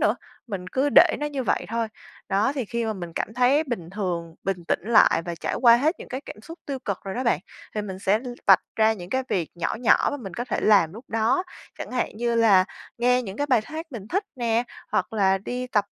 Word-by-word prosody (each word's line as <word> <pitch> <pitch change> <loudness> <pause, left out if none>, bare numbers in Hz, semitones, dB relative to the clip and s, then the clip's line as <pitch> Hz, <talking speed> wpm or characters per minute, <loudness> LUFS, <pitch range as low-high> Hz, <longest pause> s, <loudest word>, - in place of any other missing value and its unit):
nữa, - - +3 0.3
mình 190 -5 -5
cứ 265 +8 +1
để - - +7
nó 295 - -1
như 280 -3 -3
vậy - - 0
thôi. 230 0 -1 0.4
Đó, 205 +7 +2
thì 265 - -2
khi 235 +2 -3
mà 220 - -1
mình 175 -4 -7
cảm 220 +6 -4
thấy 255 +5 +3
bình 200 - -5
thường, 175 -5 -3
bình 180 -2 -3
tĩnh - - +1
lại 220 -6 +5
và 170 -1 -4
trải - - -3
qua 235 -2 +8
hết 305 +8 +1
những - - -10
cái 260 +2 -4
cảm 210 - -10
xúc 330 +2 -10
tiêu 275 -2 -3
cực 200 -6 -3
rồi 195 - -4
đó 255 - -2
bạn, 230 - +3 0.4
thì 210 - -1
mình 190 -2 -6
sẽ 200 +2 +2
l 250 +1 -8 0.2
vạch 195 -2 +7
ra 220 0 +4
những 180 -4 -9
cái 260 0 0
việc 170 -4 -1
nhỏ 170 -1 -2
nhỏ 240 - +4
mà 290 - -3
mình 195 -9 -8
có 240 - -3
thể - - -2
làm 195 -6 +4
lúc 230 +5 -11
đó. 225 +8 +1 0.4
Chẳng - - -6
hạn 250 -4 -2
như 235 0 0
là 210 -5 +5 0.3
nghe 250 +1 +3
những 195 -3 -7
cái 290 - -1
bài 250 -5 +4
hát 320 +4 -6
mình 215 -2 -7
thích 390 +4 0
nè, 235 -1 +1 0.3
hoặc - - 0
là 195 -3 +3
đi 250 +6 -4
tập 210 -5 +1
225 Hz, 255 wpm, -25 LUFS, 195-250 Hz, 0.4 s, qua